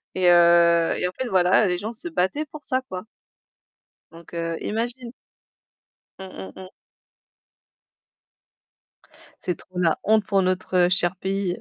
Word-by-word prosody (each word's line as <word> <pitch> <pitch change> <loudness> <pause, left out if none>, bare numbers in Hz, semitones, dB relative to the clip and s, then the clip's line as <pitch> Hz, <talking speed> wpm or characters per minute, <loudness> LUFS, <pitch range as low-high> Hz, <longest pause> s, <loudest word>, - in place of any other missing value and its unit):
Et, 185 -1 +2
heu, 170 -1 +5
et 180 - -1
en - - -5
fait 260 - -2
voilà, 190 +2 +3
les 180 -1 0
gens 215 +5 -5
se 290 +10 -2
battaient 295 - -1
pour 300 0 -12
ça, 260 -2 -1
quoi. 180 -1 -6 1.1
Donc, 165 +1 -15
heu, 165 -1 -3
imagine. 235 +2 -4 1.1
Mmh, 190 - -8
mmh, 190 - -8
mmh. 190 -1 -10 2.7
C'est 180 - -2
trop 185 -1 -9
la 165 -3 +2
honte 215 -1 +2
pour 195 -1 +2
notre 185 -1 +1
cher 180 0 +2
pays. 190 -1 -2
185 Hz, 140 wpm, -23 LUFS, 175-215 Hz, 2.7 s, heu